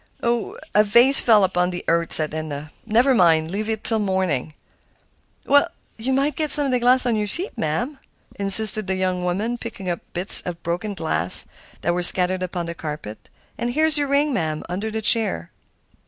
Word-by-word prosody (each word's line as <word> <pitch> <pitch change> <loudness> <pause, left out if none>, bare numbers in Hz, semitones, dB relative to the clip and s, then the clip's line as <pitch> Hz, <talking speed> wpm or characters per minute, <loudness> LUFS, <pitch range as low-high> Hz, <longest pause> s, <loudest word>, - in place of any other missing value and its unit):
"A 230 -3 -2
vase 240 +6 +4
fell 215 -4 +3
upon 180 -1 -1
the 180 -1 -7
hearth," 170 0 -1
said 155 -1 -1
Edna. 155 -1 -7 0.2
"Never 240 +5 +1
mind; 165 -6 +1
leave 215 +3 -5
it 220 -1 -5
till 225 -2 +2
morning." 185 -8 -3 0.9
"Oh! 285 +1 +3 0.3
you 235 +4 -5
might 275 +2 -1
get 310 -1 -2
some 290 -1 +10
of 270 - -3
the 250 - 0
glass 255 +1 +4
in 240 -2 -1
your 210 -1 -3
feet, 355 - -7
ma'am," 240 - -4 0.3
insisted 200 +1 +4
the 190 - -3
young 185 -1 -3
woman, 210 +7 -4
picking 195 -6 -7
up 170 - -5
bits 180 +3 +5
of 180 - -7
the 170 - -36
broken 175 +5 -5
vase 90 - +5 0.4
that 175 - -2
were 180 - -3
scattered 185 +1 +3
upon 180 -1 -5
the 170 - -7
carpet. 150 -10 -10 0.3
"And 240 +1 -4
here's 310 0 +2
your 285 - -2
ring, 285 +1 -1
ma'am, 155 -7 -4
under 190 +6 -5
the 220 0 -6
chair." 210 - 0
195 Hz, 190 wpm, -20 LUFS, 170-240 Hz, 0.9 s, some